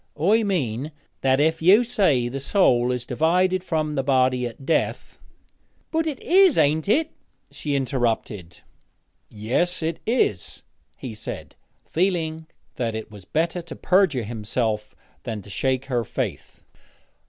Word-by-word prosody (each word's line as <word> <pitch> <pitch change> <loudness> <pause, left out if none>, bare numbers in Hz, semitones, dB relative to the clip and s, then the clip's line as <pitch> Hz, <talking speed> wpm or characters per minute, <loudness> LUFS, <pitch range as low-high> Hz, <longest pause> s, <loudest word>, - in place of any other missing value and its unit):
'I 205 +8 +4
mean 150 - -1 0.3
that 135 0 +3
if 160 +2 +2
you 195 +8 +6
say 190 - +2
the 135 +3 -4
soul 130 -6 +3
is 125 -1 -3
divided 180 +5 +1
from 155 -4 -1
the 135 - 0
body 130 -2 +2
at 120 +3 -11
death 160 +2 -1 0.3
' - - -42
'But 320 0 0
it 295 -4 -3
is 375 -2 +5
ain't 155 +5 +2
it?' 315 +8 +2 0.4
she 145 -2 -3
interrupted. 115 -9 -2 0.7
'Yes, 130 - -1
it 160 0 -2
is,' 220 - 0 0.3
he 125 - -7
said, 110 - -7 0.3
feeling 160 -3 -1 0.3
that 115 -3 -2
it 110 0 -6
was 100 -3 -12
better 165 - -1
to 170 - -10
perjure 180 - +2
himself 110 0 -3 0.3
than 110 -5 -5
to 100 - -12
shake 130 +5 -1
her 125 -3 -1
faith. - - -5
140 Hz, 140 wpm, -23 LUFS, 120-180 Hz, 0.7 s, you